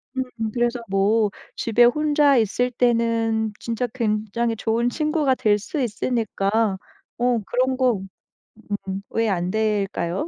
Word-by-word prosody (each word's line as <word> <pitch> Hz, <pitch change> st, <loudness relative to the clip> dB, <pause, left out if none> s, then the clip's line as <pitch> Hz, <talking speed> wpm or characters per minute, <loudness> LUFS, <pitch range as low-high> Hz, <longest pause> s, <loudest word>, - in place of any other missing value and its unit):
음 260 Hz, -, 0 dB, 0.3 s
그래서 240 Hz, 0 st, 0 dB
뭐 205 Hz, +2 st, +2 dB, 0.2 s
집에 235 Hz, +1 st, +3 dB
혼자 290 Hz, +1 st, +3 dB
있을 235 Hz, +3 st, +1 dB
때는 230 Hz, -2 st, +1 dB
진짜 235 Hz, +1 st, -2 dB
굉장히 225 Hz, 0 st, -1 dB
좋은 230 Hz, +2 st, 0 dB
친구가 305 Hz, -1 st, +1 dB
될 210 Hz, -3 st, +2 dB
수 255 Hz, +8 st, -5 dB
있으니까 220 Hz, -3 st, 0 dB, 0.4 s
어 245 Hz, -1 st, +2 dB
그런 255 Hz, +1 st, +1 dB
거 255 Hz, -2 st, +3 dB, 0.9 s
음 190 Hz, +1 st, -3 dB
왜 225 Hz, -1 st, 0 dB
안될까요? 195 Hz, -, -1 dB
230 Hz, 230 characters per minute, -23 LUFS, 215-245 Hz, 0.9 s, 집에